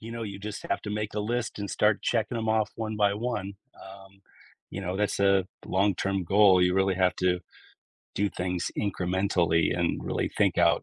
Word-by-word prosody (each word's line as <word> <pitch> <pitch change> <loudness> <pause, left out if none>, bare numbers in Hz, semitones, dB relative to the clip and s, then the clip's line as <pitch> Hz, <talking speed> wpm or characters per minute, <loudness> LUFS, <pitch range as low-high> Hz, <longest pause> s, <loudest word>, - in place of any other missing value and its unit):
you 115 +1 -8
know, 115 - -5
you 100 -3 -6
just 105 0 -7
have - - 0
to 105 - -5
make 105 0 -3
a 105 - -1
list 120 +1 -2
and 100 -1 -4
start 105 -1 +2
checking 115 0 0
them 110 -1 -2
off 110 -1 +1
one 110 -1 -4
by 100 -1 +2
one, 105 -4 -3 0.3
um, 95 0 -13 0.5
you 95 - -5
know, 95 0 -3
that's 105 -1 -1
a 100 -1 +4 0.2
long-term 95 -1 0
goal. 95 0 +5
You 90 0 +3
really 95 0 +2
have 90 -1 +2
to 90 -1 +1 0.7
do 100 +1 +1
things 90 -1 -3
incrementally 90 -4 +1
and 85 - 0
really - - -2
think - - +2
out, - - +4
100 Hz, 195 wpm, -27 LUFS, 95-105 Hz, 0.7 s, goal